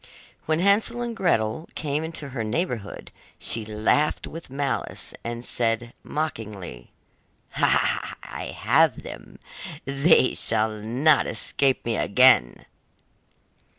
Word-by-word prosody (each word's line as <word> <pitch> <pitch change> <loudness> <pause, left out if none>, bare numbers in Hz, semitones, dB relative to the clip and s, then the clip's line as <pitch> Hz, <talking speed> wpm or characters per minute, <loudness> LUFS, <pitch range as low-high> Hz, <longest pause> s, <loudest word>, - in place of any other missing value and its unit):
When 155 0 +2
Hansel 205 +6 +2
and 235 -1 -4
Gretel 155 - 0
came 150 0 -2
into 160 -3 -4
her 125 -4 -4
neighbourhood, 115 - -3 0.3
she 115 - -2
laughed 110 +8 0
with 165 -2 -9
malice, 135 -6 -2
and 120 +1 -5
said 115 0 0
mockingly: 105 - -5 0.7
'I - - -1
have - - +3
them, - - -10 0.5
they 140 0 +4
shall 110 +1 +1
not 125 +8 +2
escape 135 -2 +1
me 115 -2 -1
again! 125 - +4
130 Hz, 105 wpm, -24 LUFS, 110-155 Hz, 0.7 s, they